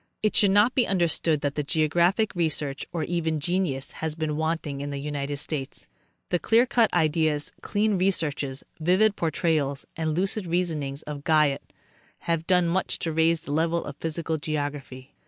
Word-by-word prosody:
It 215 - +1
should 205 - +6
not 205 +5 +4
be 250 - +2
understood 170 -4 +1
that 145 0 -2
geographic 175 +7 +2
research, 155 -5 -1
or 170 -3 -2
even 165 -2 -1
genius, 165 -4 -1
has 160 -1 -3
been 155 -2 -2
wanting 160 -3 -2
in 145 - -4
the 140 - -4
United 145 0 -3
States. 140 -2 -4 0.4
The 175 - +1
clear 230 +6 +4
cut 235 -2 +2
ideas, 155 -2 +1
keen 205 -2 +1
researches, 150 -8 -1 0.2
vivid 190 +6 +3
portrayals 155 -4 0
and 160 -1 -1
lucid 190 +1 -1
reasonings 155 -5 -1
of 145 -1 -7
Guyot 150 -2 +2 0.5
have 165 -1 -1
done 180 -2 +3
much 180 +2 0
to 165 - -3
raise 160 +1 +2
the 145 - -8
level 165 +3 +1
of 145 - -7
physical 160 0 -2
geography. 145 -4 -4
160 Hz, 160 wpm, -26 LUFS, 145-175 Hz, 0.5 s, should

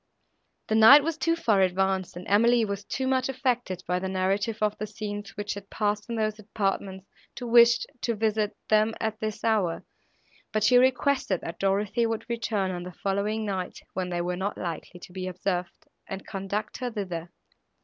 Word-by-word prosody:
The - - -2
night 225 +7 +9
was 330 +1 -1
too 330 +1 +1
far 220 -12 +2
advanced 190 0 +1
and 180 - -8
Emily 230 +3 +4
was 200 -1 -4
too 265 +5 -3
much 260 0 +1
affected 245 -8 -1
by 180 0 0
the 190 +1 -3
narrative 195 +4 0
of 210 -1 +1
the 215 - -3
scenes, 205 -1 -6
which 205 0 -2
had 200 -1 -10
passed 210 +1 -1
in 235 - -2
those 215 -1 -1
apartments, 195 -2 -3 0.3
to 245 - -6
wish 235 0 +6 0.2
to 235 - 0
visit 215 -1 0
them 215 +1 +3
at 220 0 -2
this 215 -1 -4
hour, 205 -7 +1 0.7
but 215 -1 0
she 245 +4 +6
requested 260 - +2
that 170 - -7
Dorothée 205 +4 +1
would 225 -1 -3
return 220 -5 -1
on 175 -1 -4
the 180 0 -8
following 200 +4 -1
night, 190 -3 -3 0.2
when 185 -1 -2
they 175 -1 -1
were 180 +1 -2
not 190 +3 -3
likely 175 +1 -5
to 180 - -12
be 185 0 -4
observed, 180 -1 -3 0.2
and 195 0 -6
conduct 200 +2 -4
her 250 -1 -3
thither. 180 -7 -5
205 Hz, 185 wpm, -27 LUFS, 190-225 Hz, 0.7 s, night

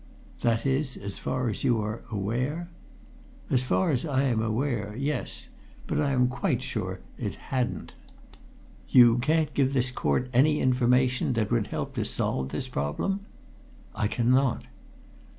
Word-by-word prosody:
"That 115 +1 +1
is, 135 0 0
as 100 -1 -6
far 130 -1 -1
as 110 - -3
you 120 -3 +3
are 105 +2 -3
aware?" 125 - -2 0.8
"As 130 - +3
far 95 - +1
as 130 - +1
I 140 -4 +1
am 120 -5 +1
aware 110 -2 -1
yes! 140 +1 -3 0.4
But - - 0
I 145 - +1
am 125 -2 +3
quite 130 +2 -1
sure - - -4 0.2
it - - -3 0.2
hadn't." 125 -1 -1 1.0
"You 120 -1 +7
can't 155 +3 +1
give 135 -1 +2
this 130 0 +2
court 125 - 0
any 150 +5 +4
information 125 0 +2
that 110 -2 -1
would 115 -4 +1
help - - -4
to - - 0
solve 65 0 -1
this 130 - -4
problem?" 130 - -2 0.7
"I 105 - 0
cannot!" 125 +3 +2
125 Hz, 150 wpm, -27 LUFS, 115-135 Hz, 1.0 s, You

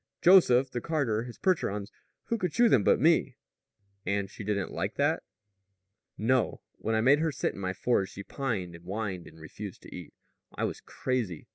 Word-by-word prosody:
Joseph 135 -8 +6
the 120 - -3
carter, 125 -9 0
his 120 - -9
Percherons; 105 - 0 0.3
who 230 - -2
could 180 -4 -1
shoe 240 0 +6
them 110 - +4
but - - +4
me?" - - +3 0.7
"And 100 -1 -1
she 105 - -8
didn't 100 -2 -1
like - - -3
that?" - - +1 1.0
"No. 125 +2 +1 0.2
When 110 +1 -1
I 110 - +2
made 135 +5 +5
her 160 0 +1
sit 140 - -2
in - - -10
my 95 -1 -2
forge 100 -1 +1
she 100 - -7
pined 105 -9 -3
and 85 0 -12
whined 95 -2 -4
and 80 - -15
refused 95 +5 -9
to - - -10
eat. - - -10 0.4
I - - -3
was - - -2
crazy. 115 -11 -3
110 Hz, 185 wpm, -29 LUFS, 100-135 Hz, 1.0 s, Joseph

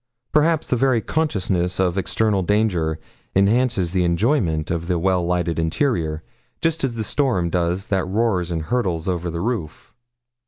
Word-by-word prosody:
Perhaps 160 +1 +3
the - - +1
very 130 -1 +2
consciousness 95 - -1
of 90 -2 +2
external 100 +1 +1
danger 90 -6 +1 0.4
enhances 100 -2 +2
the 90 -2 +2
enjoyment 85 - +1
of 85 -1 -2
the 90 -1 +1
well 90 +1 +1
lighted 85 -1 0
interior, 80 - 0 0.4
just 165 -1 0
as 130 -3 -1
the 110 - -2
storm 110 - 0
does 90 +2 0
that 95 -2 +1
roars 95 -3 0
and 80 -2 -2
hurtles 90 -6 -1
over 90 -1 -1
the 85 0 -4
roof. 105 -8 -4
95 Hz, 155 wpm, -21 LUFS, 85-115 Hz, 0.4 s, Perhaps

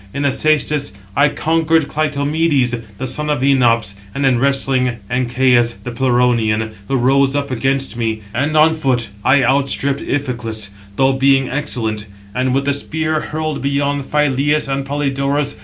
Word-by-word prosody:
In 140 - -2
the 140 - +3
cæstus 150 -1 +1 0.2
I 145 +1 +4
conquered 160 +1 +1
Clytomedes, 145 -3 0 0.2
the 130 - -4
son 150 +4 -1
of 145 -4 0
Enops; 120 -7 +2 0.2
and 140 - 0
in 130 -3 +3
wrestling, 135 -2 +1
Ancæus, 125 -1 +2
the 125 - -5
Pleuronian, 120 -3 +1 0.2
who 135 - 0
rose 135 +2 +2
up 140 -1 -2
against 135 +2 -1
me; 110 -2 -2
and 145 +5 0
on 155 +1 +5
foot 130 -8 -1
I 135 -1 +4
outstripped 140 +1 +1
Iphiclus, 120 -7 -3 0.2
though 135 +3 +3
being 135 0 +2
excellent; 115 -7 -2 0.3
and 130 +3 0
with 135 0 0
the 140 - +1
spear 155 +2 -1
hurled 155 -1 -3
beyond 140 0 -1
Phyleus 145 +1 +1
and 135 0 -3
Polydorus. 140 0 -1
135 Hz, 150 wpm, -17 LUFS, 125-145 Hz, 0.3 s, on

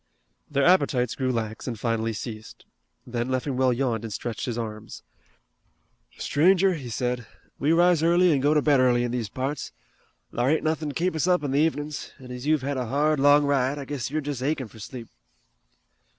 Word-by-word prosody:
Their 140 -1 +1
appetites 135 -9 +3
grew 130 -1 -1
lax 110 -2 -4
and 115 -4 -4
finally 115 -1 -1
ceased. 110 0 -8 0.4
Then 120 0 -3
Leffingwell 130 0 +1
yawned 120 -3 -1
and 115 - -6
stretched 115 +2 -4
his 120 -2 -3
arms. 110 -1 -6 1.1
"Stranger," 185 +5 +3
he 135 -7 -6
said, 125 0 -2 0.3
"we 145 - +2
rise 175 -1 +4
early 175 +1 +4
an' 140 - +2
go 145 +3 +2
to 150 - +3
bed 145 -3 +4
early 125 -1 +3
in 120 - -2
these 120 -4 -2
parts. 135 +5 -4 0.6
Thar 120 +2 +1
ain't 155 - +1
nothin' 155 -1 -1
to 145 - -7
keep 175 0 0
us 160 +3 0
up 180 -4 +3
in 140 - -2
the 140 - +2
evenin's, 150 -2 -3
an' 130 -1 -11
as 125 +3 -6
you've 155 -3 +2
had 140 0 -2
a 125 -2 -2
hard, 150 +4 +1
long 145 +1 +5
ride 140 0 +1
I 140 - -6
guess 140 -3 -4
you're 155 +2 -2
just 145 -3 -4
achin' 140 -2 -1
fur 110 - -15
sleep." 120 +2 -8
135 Hz, 195 wpm, -25 LUFS, 120-150 Hz, 1.1 s, long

